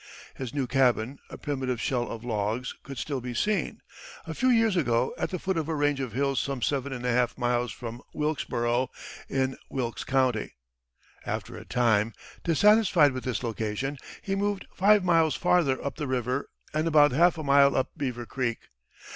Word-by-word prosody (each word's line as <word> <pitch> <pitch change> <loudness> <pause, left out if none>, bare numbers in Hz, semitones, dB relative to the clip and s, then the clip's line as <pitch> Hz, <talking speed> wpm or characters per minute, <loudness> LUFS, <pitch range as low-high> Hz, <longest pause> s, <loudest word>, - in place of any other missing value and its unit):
His 130 -3 -5
new 140 -1 -1
cabin, 125 0 +1
a - - -8
primitive 130 -4 -2
shell 120 -1 -1
of 115 0 -6
logs, 115 +1 -2
could 135 -1 -9
still 135 +3 -3
be 125 0 -5
seen, 205 - -1 0.4
a 160 - -5
few 255 +10 +1
years 225 -4 +4
ago, 125 -7 +1
at - - -2
the 185 - -3
foot 190 +1 -2
of 160 -1 -2
a 160 - 0
range 145 -1 +1
of 130 -5 -4
hills 135 +1 +1
some 135 -4 -3
seven 140 -1 0
and 125 -2 -5
a 125 - +2
half 125 0 +1
miles 120 -1 0
above 120 0 -6
Wilkesboro, 130 -5 -1 0.4
in 130 -1 0
Wilkes 120 -3 -3
County. 130 -5 0 0.7
After - - -4
a - - -9
time, 115 -3 +2 0.3
dissatisfied 180 -3 +5
with 130 -1 -6
this 125 -3 -2
location, 115 +4 -3 0.2
he 195 - -2
moved 200 0 -1
five 205 +1 +4
miles 165 -3 +3
farther 170 -7 +2
up 140 - -3
the 150 -2 -3
river 130 +1 -1 0.2
and 155 +2 0
about 150 -3 +6
half 170 +6 +4
a 155 - -4
mile 140 0 +5
up 130 - 0
Beaver 125 -6 -3
Creek. 120 -2 -2
135 Hz, 180 wpm, -27 LUFS, 120-155 Hz, 0.7 s, about